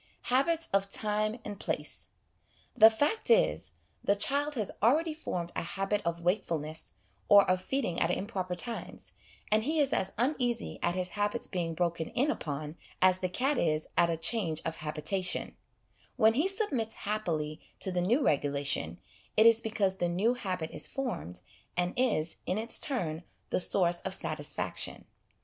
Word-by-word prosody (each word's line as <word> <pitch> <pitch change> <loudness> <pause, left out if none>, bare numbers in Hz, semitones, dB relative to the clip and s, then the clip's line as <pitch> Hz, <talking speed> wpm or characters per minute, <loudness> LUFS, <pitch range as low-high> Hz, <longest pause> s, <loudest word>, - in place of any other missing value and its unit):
Habits 325 +5 +3
of 195 0 +2
Time 215 +2 -1
and 205 -2 -6
Place. - - -2 0.7
The 220 -2 +9
fact 290 - 0
is, - - +3 0.3
the 200 - +3
child 285 +7 +2
has 215 -5 -1
already 310 +9 +3
formed 175 - -4
a - - -1
habit 195 +4 -2
of 170 0 -2
wakefulness 165 -4 -1 0.4
or 200 -1 +8
of 185 0 +2
feed 265 +7 -1
ing 175 - -2
at 165 - +2
improper 185 -1 -2
times, 230 +6 -5 0.4
and 215 +1 +3
he 310 +5 0
is 280 -2 +2
as 190 0 0
uneasy 245 -1 -1
at 175 - 0
his 180 -1 -1
habits 205 +3 -1
being 170 -3 -3
broken 170 -1 -1
in 280 +5 +1
upon 150 - -5 0.2
as 185 0 +4
the 185 - -1
cat 265 +8 0
is 155 -2 0
at 170 0 +4
a 165 - 0
change 165 -2 0
of 165 0 -3
habitation; 160 +5 -1 0.6
when 220 0 +5
he 295 +10 +2
submits 305 - -1
happily 165 -8 -2 0.2
to 190 - -1
the 180 -1 0
new 235 +11 +2
regulation, 140 - 0 0.4
it 220 - +6
is 230 0 +6
because 205 -4 0
the 175 - +1
new 200 +8 +2
habit 185 -9 -4
is - - -3
formed, 160 - -4 0.4
and 180 0 0
is, 235 -11 +1
in 185 - 0
its 225 +1 +2
turn, 170 - -1 0.3
the - - +2
source 175 -1 +3
of 190 0 -1
satisfaction. 150 -5 -3
195 Hz, 165 wpm, -30 LUFS, 170-235 Hz, 0.7 s, The